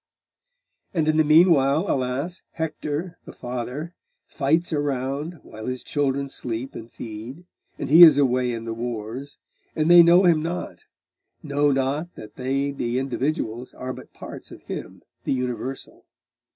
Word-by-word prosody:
'And 160 -2 +1
in 155 0 +3
the 155 - +5
meanwhile, 155 -1 +5
alas! 135 +7 -2
Hector, 160 +1 -4
the - - -9
father, 125 +7 -5 0.3
fights 160 +4 0
around, 145 +2 -2
while 110 0 -9
his 130 0 -4
children 140 -1 -1
sleep 125 -1 -5
and 115 +1 -9
feed; 115 +9 -8 0.3
and - - -4
he 160 +4 +7
is 160 -4 +10
away 125 -3 +2
in 115 -1 -5
the 115 - -3
wars, 120 +3 -5 0.4
and 155 +2 +2
they 175 0 +10
know 170 +2 +6
him 165 -3 +4
not 170 +3 -5 0.6
know 145 -1 +1
not 140 +6 -1
that 105 - -11
they 135 +2 -1
the 125 -3 -2
individuals 130 -2 -2
are 130 0 -5
but - - -12
parts - - -10
of - - -13
him - - -7 0.2
the - - 0
universal. 125 +1 -5
140 Hz, 150 wpm, -24 LUFS, 125-155 Hz, 0.6 s, is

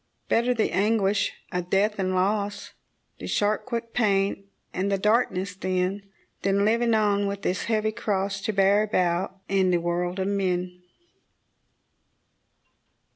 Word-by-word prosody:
Better 245 +2 +2
the 220 - 0
anguish 205 +1 +1 0.2
of 180 -1 -3
death 205 +2 +1
and 185 -1 0
loss, 205 +2 -1 0.5
The - - -6
sharp, 210 +1 0
quick 230 -2 -4
pain, 200 -3 +1 0.3
and 195 +2 -1
the 195 - +2
darkness, 200 -2 +1
then, 185 +1 -1 0.4
Than 195 +1 +2
living 230 +1 +2
on 205 -2 +2
with 200 0 -4
this 185 - -1
heavy 215 -1 0
cross 200 -3 -2
To 215 - -1
bear 200 +1 +4
about 185 -3 0
in 190 -1 +2
the 180 - +3
world 175 +1 -2
of 190 0 -1
men. 180 -2 -1
200 Hz, 135 wpm, -25 LUFS, 185-210 Hz, 0.5 s, bear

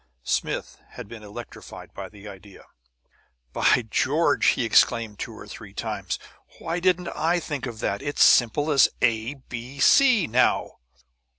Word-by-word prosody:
Smith - - -3
had - - -9
been 115 0 -10
electrified 105 +3 -11
by - - -8
the 105 -1 -13
idea. 100 0 -13 0.9
"By 125 - +3
George!" 145 +6 +1
he 120 - +2
exclaimed 110 -1 +2
two - - -6
or - - -10
three - - -11
times. - - -4 0.4
"Why 165 +2 -3
didn't 180 -1 +1
I 170 +3 0
think 145 -5 -5
of 115 -2 -8
that? 100 - -2
It's 145 0 +1
simple 145 +6 +4
as 140 -3 +5
A, 115 +3 +1
B, 130 0 -9
C 245 - +5
now!" 125 +1 +1
125 Hz, 150 wpm, -24 LUFS, 110-155 Hz, 0.9 s, as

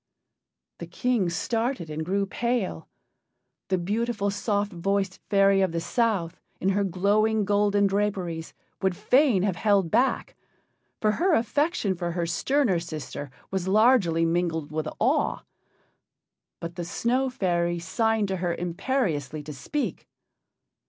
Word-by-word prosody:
The - - -6
King 245 -8 0
started 230 +2 -1
and 155 +1 -3
grew 195 +4 0
pale. 230 - -2 0.8
The 185 - +1
beautiful, 205 +3 -1
soft 205 0 -1
voiced 195 +2 -1
fairy 195 -1 +4
of 185 -3 +1
the 165 - 0
South, 200 -4 0 0.2
in 190 - +1
her 200 +1 +2
glowing 205 +3 +2
golden 205 0 +3
draperies, 190 -5 -1 0.3
would 190 -2 +1
fain 245 -2 +3
have 195 -4 0
held 200 -5 +2
back, 260 +2 +1 0.6
for 215 - +2
her 340 - +2
affection 265 - +1
for 175 -1 -3
her 170 -1 -1
sterner 195 - +1
sister 155 -3 -6 0.2
was 190 -1 -2
largely 195 -6 +4
mingled 165 -3 -1
with 155 0 -2
awe. 275 +6 +1 1.2
But 170 0 -7
the 175 - -2
Snow 250 +9 0
fairy 175 -7 0
signed 220 +5 0
to 190 - -1
her 175 -1 -1
imperiously 170 - -2
to 150 +1 -7
speak. 285 - -4
195 Hz, 130 wpm, -26 LUFS, 170-225 Hz, 1.2 s, fairy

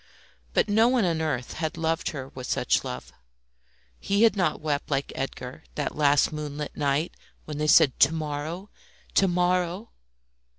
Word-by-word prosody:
But - - +3
no 220 +3 +4
one 245 -4 +3
on 165 -2 0
earth 130 -6 -2
had 160 0 -3
loved 165 0 0
her 135 -3 -6
with 130 -1 -8
such - - +1
love. - - -7 0.9
He 200 +2 +1
had 225 -3 +5
not 180 -6 0
wept 150 -2 -2
like 140 -1 -1
Edgar 135 +2 -5
that 145 - -2
last 145 0 +3
moonlit 150 -1 -5
night 145 +3 0 0.3
when 150 -1 -6
they 150 - 0
said, 150 -4 +5
"To - - +6
morrow! 160 +4 -4 0.4
to 195 - +4
morrow!" 180 +3 0
155 Hz, 160 wpm, -26 LUFS, 145-180 Hz, 0.9 s, To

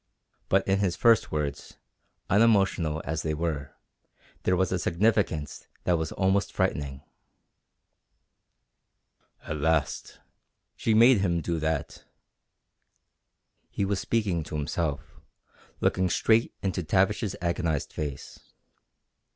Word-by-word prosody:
But 95 0 +2
in 95 0 +2
his 95 -4 0
first 115 -4 +3
words, 75 -2 -4 0.5
unemotional 95 -7 +2
as 80 0 -2
they 80 -1 -2
were, 75 -4 -3 0.7
there 90 - +2
was 95 0 +1
a 95 - 0
significance 85 -4 0 0.2
that 90 - +2
was 80 -1 -2
almost 95 +1 +1
frightening. 70 -1 -2 2.4
"At 75 - -4
last! 80 0 -1 0.6
She 110 - +1
made 120 +1 +6
him 85 -3 +1
do 85 0 -2
that!" 80 +1 -3 1.7
He 100 - -2
was 100 0 -1
speaking 100 -7 0
to - - -6
himself, 75 -1 -3 0.6
looking 95 0 +2
straight 115 +6 +2
into 95 -1 -1
Tavish's 95 +5 +1
agonized 85 -3 -1
face. 75 -3 -6
85 Hz, 110 wpm, -27 LUFS, 80-100 Hz, 2.4 s, made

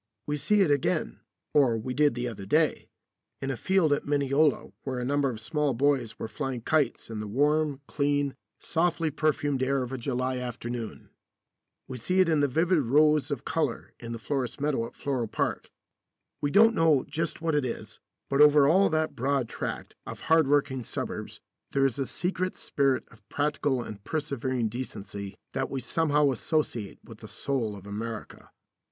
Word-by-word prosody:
We 150 - -1
see 200 +9 +2
it 170 -6 +4
again 140 -2 0 0.3
or 130 -6 +4
we 125 +3 -4
did 145 -2 +3
the 125 0 -2
other 100 -5 -7
day 155 +6 +2 0.5
in 135 - -2
a - - -2
field 165 - +2
at 145 - -1
Mineola 145 +1 +2
where 130 -2 -4
a 125 - -2
number 140 +1 +1
of 115 -4 -5
small 145 +4 0
boys 135 -3 +1
were - - -4
flying 135 0 -4
kites 145 -3 0
in 110 - -4
the 105 - -4
warm, 145 +4 +1
clean, 145 -1 0 0.2
softly 165 -1 0
perfumed 145 -2 0
air 135 0 +1
of 125 - -6
a 130 - -4
July 130 +1 -1
afternoon. 120 -2 -6 0.8
We 130 -1 -6
see 185 +11 0
it 185 -2 +5
in 155 -2 +3
the 145 - +3
vivid 165 +6 +2
rows 150 +3 +3
of 140 -5 -4
colour 150 -7 -2
in 115 -1 -7
the 115 - -3
florist's 130 +1 -3
meadow 135 -5 0
at - - -16
Floral 130 -5 -2
Park. - - -2 0.7
We 145 - +1
don't 225 +8 +6
know 160 - +3
just 160 +3 -2
what 160 -1 -1
it 150 -1 +2
is, 125 - -5 0.3
but 140 +1 +2
over 150 -1 +7
all 190 +6 +5
that 155 0 0
broad 135 0 0
tract - - -5
of - - -7
hardworking 145 -4 +3
suburbs 115 - -5 0.3
there 135 0 +3
is 135 -1 0
a 135 - -1
secret 185 +1 -2
spirit 135 -2 +1
of 110 -1 -21
practical 145 -3 0
and 100 -3 -9
persevering 130 -5 -1
decency 100 -4 -6 0.2
that 135 0 -1
we 135 - -3
somehow 150 +2 +2
associate 120 -6 -1
with 115 -2 -13
the 110 - -10
soul 115 0 -2
of 100 -1 -11
America. 110 +2 -6
140 Hz, 180 wpm, -28 LUFS, 120-150 Hz, 0.8 s, over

